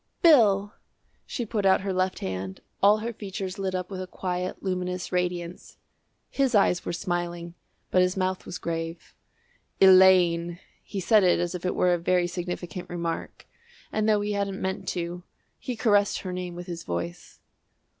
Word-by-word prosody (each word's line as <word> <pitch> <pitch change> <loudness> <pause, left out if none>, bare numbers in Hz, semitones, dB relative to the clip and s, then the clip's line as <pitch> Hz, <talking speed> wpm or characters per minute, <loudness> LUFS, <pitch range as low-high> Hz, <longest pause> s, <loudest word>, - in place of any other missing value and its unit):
"Bill!" 210 - +5 0.5
She 240 - -3
put 215 -1 -2
out 190 0 +4
her 195 -1 -2
left 185 0 0
hand, 95 0 -5 0.2
all 205 +2 +6
her 235 - -3
features 195 -2 -6
lit 190 -1 -2
up 180 +1 -4
with 185 -1 -4
a 185 - -5
quiet 180 0 -4
luminous 180 -1 -3
radiance. 180 -1 -3 0.5
His 270 -4 +1
eyes 185 -3 +3
were - - -3
smiling, 175 -1 -3 0.4
but 185 - +4
his 180 +1 +1
mouth 185 0 -1
was 180 - -5
grave. 165 0 -5 0.7
"Elaine!" 180 -3 +6 0.2
He 200 - -6
said 210 +2 +4
it 180 -2 +4
as 175 0 -1
if 180 0 -3
it - - -1
were 180 -1 +3
a 175 - 0
very 180 +1 +2
significant 175 0 -5
remark, 170 -1 -4 0.5
and, 215 0 +1
though 210 -1 +3
he 205 0 -2
hadn't 200 -1 -2
meant 190 0 -3
to, 175 0 -3 0.4
he 250 - -4
caressed 205 -3 +2
her 185 -2 -5
name 180 -1 -5
with 175 0 -7
his 170 -2 -6
voice. 85 - -5
185 Hz, 170 wpm, -26 LUFS, 175-195 Hz, 0.7 s, all